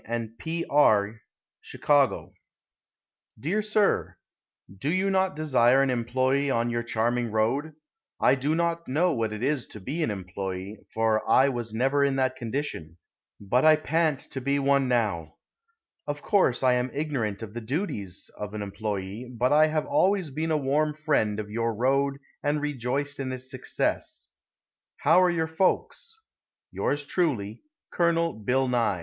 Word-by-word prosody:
& 115 +1 -13
P. 165 +1 -3
R'y, 110 -7 +3 0.4
Chicago. 145 -2 +1 1.1
Dear 175 - 0
Sir: 210 -1 +1 0.6
Do 140 - -2
you 190 +2 +1
not 190 -3 +1
desire 135 -4 +3
an 135 - +1
employe 130 +3 +1
on 120 0 0
your 120 0 -1
charming 120 +1 -1
road? 120 +9 0 0.5
I - - +5
do 140 +4 0
not 170 0 -1
know 165 +7 +2
what 115 -4 -1
it 110 +2 -5
is 140 -1 0
to 110 - -10
be 140 - -4
an 155 - +1
employe, 95 0 -5
for 110 -1 +1
I 135 +2 +5
was 120 -4 -4
never 135 +5 +1
in 140 -1 +1
that 130 -1 +1
condition, 115 - -5 0.4
but 115 +6 +1
I 155 0 +7
pant 155 -2 0
to 135 - -4
be 140 +2 +1
one 140 -1 +2
now. 105 -10 -1 0.7
Of 145 0 -4
course 185 - +2
I 130 -1 +5
am 125 +1 0
ignorant 125 -9 -2
of 105 -2 -8
the 120 - -5
duties 110 - -4
of 105 0 -5
an 105 - -3
employe, 100 +1 -4
but 125 +3 +1
I 155 +1 +6
have 155 -1 -1
always 180 +2 +1
been 160 +4 -2
a 155 - +2
warm 150 +2 0
friend 145 -9 0
of 105 -1 -6
your 115 0 -1
road 135 +4 +1 0.2
and 145 +1 0
rejoiced 145 0 -2
in 130 -1 -3
its 130 0 -6
success. 130 - -3 0.7
How 165 +5 +4
are 180 - +4
your 165 -2 0
folks? 190 - -1 0.5
Yours 145 0 -1
truly, 125 - -1 0.3
COL. 170 -1 +1
BILL 125 +5 0
NYE. 115 -7 +1
130 Hz, 160 wpm, -26 LUFS, 115-150 Hz, 1.1 s, I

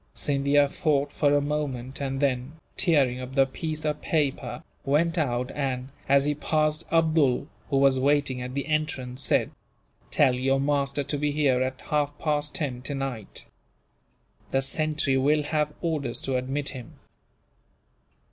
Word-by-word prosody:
Scindia 140 0 +3
thought 145 -1 0
for 145 -2 +2
a 145 - +3
moment 140 -3 -3
and 135 -1 -2
then, 135 0 0 0.2
tearing 140 -8 +2
up 130 +1 -7
the 135 -1 +5
piece 155 +3 -4
of 150 0 -1
paper, 150 -4 -1 0.2
went 165 +5 +2
out 125 -5 0
and, 130 -2 -2 0.2
as 140 0 +5
he 150 - +2
passed 155 +1 0
Abdool, 155 -5 +3 0.2
who 140 - +2
was 135 -1 +4
waiting 135 -2 +1
at 125 +1 -6
the 140 - -1
entrance, 145 -4 -2
said: - - +2 0.6
"Tell 135 -3 +4
your 135 +2 +1
master 140 0 0
to 145 +1 -3
be 150 0 +1
here 140 -4 +2
at 130 0 -2
half 145 -1 -1
past 150 -2 -1
ten, 140 -8 -2
tonight. 135 -6 -5 1.0
The 135 0 +1
sentry 150 -1 +1
will 150 +3 +3
have 150 0 -1
orders 150 -8 -2
to 135 - -1
admit 135 +3 -1
him." 125 -4 -9
140 Hz, 150 wpm, -26 LUFS, 130-150 Hz, 1.0 s, the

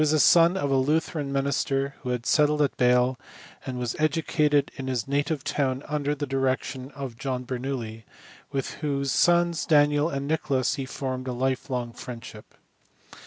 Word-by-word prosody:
He - - +5
was 150 - +2
the 155 - +3
son 170 +4 +6
of 140 -6 -1
a 135 - +3
Lutheran 150 +1 0
minister 140 0 0
who 125 - -6
had 125 -1 -2
settled 150 +1 +3
at 140 - -1
Bale, 125 +1 +3 0.5
and 130 -1 -3
was 120 -2 -2
educated 155 -1 +2
in 130 - -6
his 125 -3 -2
native 145 +1 -1
town 135 -1 -1
under 150 -1 -1
the 145 0 -3
direction 135 -1 -1
of 130 -4 -6
John 130 -2 -3
Bernoulli, 125 -4 -4 0.5
with 135 -1 -2
whose 140 -2 -1
sons 175 -2 +3
Daniel 145 0 +3
and 140 -2 -3
Nicholas 140 -5 0
he 135 - -3
formed 130 -1 -4
a 125 - -2
life 130 +2 -1
long 120 -2 -3
friendship. 115 -3 -10
135 Hz, 170 wpm, -26 LUFS, 130-150 Hz, 0.5 s, son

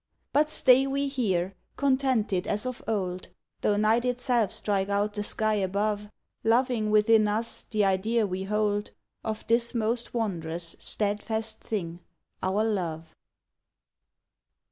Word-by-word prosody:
But 300 +2 +3
stay 265 -2 +5
we 280 +1 0
here, 195 -9 0 0.2
contented 260 -9 +1
as 210 +4 +1
of 255 -1 -4
old, 185 -4 -2 0.3
Though 205 - +2
night 220 +3 +3
itself 245 -3 +1
strike 195 -1 -1
out 205 +1 0
the 205 - -2
sky 215 +1 0
above, 205 +1 -1 0.3
Loving 230 -1 +2
within 215 0 +5
us 220 +3 -2
the 210 -2 +2
idea 210 +4 +1
we 190 0 -3
hold 210 0 0 0.3
Of 215 -1 -4
this 235 +2 +2
most 230 +1 0
wondrous, 170 -7 -2
steadfast 220 +1 -2
thing, 175 -7 -4 0.4
our 195 +3 +1
love. 170 -7 -2
215 Hz, 125 wpm, -27 LUFS, 200-235 Hz, 0.4 s, stay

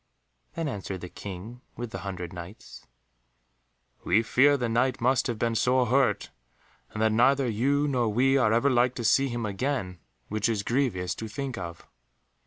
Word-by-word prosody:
Then 165 -2 -2
answered 100 -7 -5
the 90 - -7
King 100 +7 -8 0.2
with 120 -1 -5
the - - -5
hundred 90 -3 -6
Knights, 90 +4 -11 1.2
"We 110 +6 +3
fear 140 +5 +4
the 125 -3 -1
Knight 125 +3 +1
must 130 +2 +2
have 120 -3 -2
been 115 +1 0
sore 125 +2 +2
hurt, 130 +1 +1 0.6
and 105 - -7
that 110 - +3
neither 130 +4 +3
you 140 +6 +1
nor 125 -5 +1
we 130 +5 +3
are 125 -6 +3
ever 120 +5 +3
like 125 0 +2
to 120 - -4
see 135 +4 +3
him 120 -2 -3
again, 100 -4 -2 0.3
which 110 +2 -1
is 105 -3 -1
grievous 105 -9 0
to 110 - -6
think 135 +2 -5
of." 85 -4 -7
120 Hz, 175 wpm, -27 LUFS, 105-130 Hz, 1.2 s, fear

